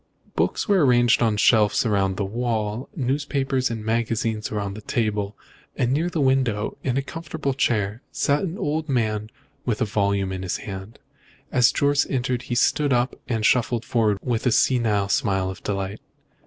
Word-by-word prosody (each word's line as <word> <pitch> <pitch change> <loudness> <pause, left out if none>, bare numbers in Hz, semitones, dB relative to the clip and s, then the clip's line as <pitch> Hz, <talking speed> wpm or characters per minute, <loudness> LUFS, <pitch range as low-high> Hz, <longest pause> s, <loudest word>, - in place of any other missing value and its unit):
Books - - 0
were 195 -6 +4
arranged 120 -3 +4
on 110 -3 +2
shelves 105 +1 +4
round 95 -3 +1
the 100 - -1
walls, 110 +1 -2
newspapers 135 -2 0
and 110 -2 -5
magazines 110 -1 -1
were 105 - -2
on 100 -1 -3
the 110 - -8
table, 105 -2 -1 0.4
and 125 0 0
near 165 +5 +1
the 170 - -3
window, 130 -6 +1
in 130 -1 0
a 135 - 0
comfortable 160 -2 -4
chair, 110 -4 0
sat 145 +1 +1
an 185 0 -3
old 155 +1 -2
man 110 -4 0 0.3
with 115 -4 -1
a 125 - +2
volume 100 -2 0
in 95 -1 -4
his 95 -1 -2
hand. 95 +1 -8 0.5
As 125 -2 +5
Jorce 145 0 +2
entered 125 -1 -1
he 120 - 0
stood 145 +4 +2
up 125 +1 +1
and 110 -3 -1
shuffled 120 -1 +2
forward 110 -4 +1
with 120 0 -1
a - - +3
senile 110 -4 +2
smile 95 -2 +1
of 95 - -10
delight. 100 +1 -3
115 Hz, 175 wpm, -23 LUFS, 105-130 Hz, 0.5 s, As